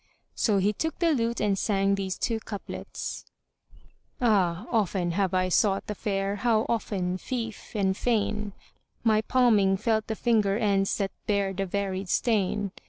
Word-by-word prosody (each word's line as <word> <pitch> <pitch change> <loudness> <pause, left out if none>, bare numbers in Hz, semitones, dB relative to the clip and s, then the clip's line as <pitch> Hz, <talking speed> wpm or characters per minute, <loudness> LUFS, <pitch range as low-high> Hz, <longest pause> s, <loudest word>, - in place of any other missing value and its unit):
So 210 -4 +2
he 200 +2 +2
took 320 +8 -3
the 340 -2 +2
lute 235 -3 0
and 205 -2 +2
sang 195 0 +1
these 195 -1 -2
two 230 -2 -1
couplets:— 205 -2 -6 1.0
Ah, 195 -5 +2
often 190 -6 +1
have 190 +1 0
I 185 0 +2
sought 195 +2 +2
the 210 - -4
fair; 200 -1 -2
how 225 -1 +2
often 185 -5 -1
lief 230 -4 -4
and 190 -2 +1
fain 210 -2 -1 0.2
* - - -44
My 215 -2 +4
palming 220 -6 +3
felt 220 +1 0
the 220 - -2
finger 210 -4 +2
ends 200 -3 +1
that 195 -2 -1 0.2
bear 200 -2 +1
the 195 +1 -2
varied 195 0 -2
stain! 205 -3 +1
205 Hz, 160 wpm, -27 LUFS, 195-225 Hz, 1.0 s, My